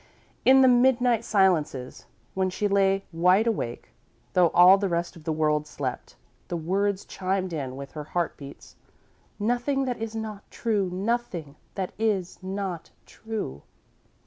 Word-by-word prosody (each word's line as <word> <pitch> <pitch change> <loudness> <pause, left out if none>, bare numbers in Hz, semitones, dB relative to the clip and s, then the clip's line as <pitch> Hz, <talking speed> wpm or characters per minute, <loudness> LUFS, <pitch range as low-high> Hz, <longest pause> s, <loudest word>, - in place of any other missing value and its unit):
In 265 +1 +7
the 260 - +7
midnight 245 -2 +4
silences, 165 - 0 0.3
when 190 0 0
she 205 +3 -1
lay 195 -1 +2
wide 180 +6 +4
awake, 205 - -3 0.4
though 180 -1 +5
all 180 +4 +7
the 200 -1 0
rest 170 +1 -2
of 160 -2 -14
the 160 - -1
world 150 -1 +1
slept, 130 -4 -5 0.3
the 175 - -3
words 195 +4 -1
chimed 185 -1 -2
in 135 -5 -4
with 140 0 -8
her 150 -1 -7
heart 170 +1 -2
beats: 140 -1 -12 0.6
"Nothing 245 +5 0
that 245 -3 -3
is 225 0 -4
not 215 -2 -6
true 210 -5 -1
nothing 185 -7 -2 0.2
that 190 -2 -3
is 200 -6 -1
not 190 -3 -4 0.2
true." 220 - -6
190 Hz, 145 wpm, -26 LUFS, 165-220 Hz, 0.6 s, In